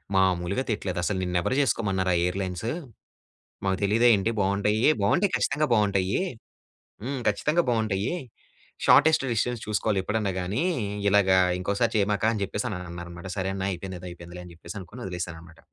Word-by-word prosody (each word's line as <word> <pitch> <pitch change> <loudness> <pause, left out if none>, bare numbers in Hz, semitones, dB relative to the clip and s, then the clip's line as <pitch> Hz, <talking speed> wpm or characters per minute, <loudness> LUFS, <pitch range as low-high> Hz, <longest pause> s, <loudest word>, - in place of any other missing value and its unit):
మామూలుగా 95 +4 +2
తిట్టలేదు. 95 -5 -2
"అసలు 95 +2 0
నిన్నెవరు 90 +6 0
చేసుకోమన్నారా 95 -8 +1
ఆ - - +3
ఎయిర్‌లైన్సు? 95 +3 -2 0.9
మాకు 95 -1 +1
తెలియదా 110 +4 +4
ఏంటి 100 +3 0
బాగుంటాయి, 100 +3 +1 0.2
బాగుంటాయి 175 - +2
ఖచ్చితంగా 150 +2 +1
బాగుంటాయి. 100 - +2 0.8
హ్మ్ 135 +2 -3
ఖచ్చితంగా 150 +11 +2
బాగుంటాయి. 110 - 0 0.7
షార్టెస్ట్ 155 -1 +6
డిస్టెన్స్ 120 +1 -1
చూసుకోవాలి 105 -1 0
ఎప్పుడైనా 105 0 -1
కానీ. 100 - -1 0.5
ఇలాగ 100 -1 +4 0.3
ఇంకోసారి 100 +5 0
చేయమాక" 105 +1 +1
అని 105 -3 -2
చెప్పేసన్నారనమాట. 85 -3 -5
సరే 95 0 -1
అన్నా! 95 0 -2
అయిపోయిందేదో 90 0 -6
అయిపోయిందిలే 85 +1 -10
అని 85 - -12
చెప్పేసి 85 +1 -10
అనుకోని 105 +7 -10
వదిలేసాననమాట. 85 -2 -7
100 Hz, 135 wpm, -26 LUFS, 90-110 Hz, 0.9 s, షార్టెస్ట్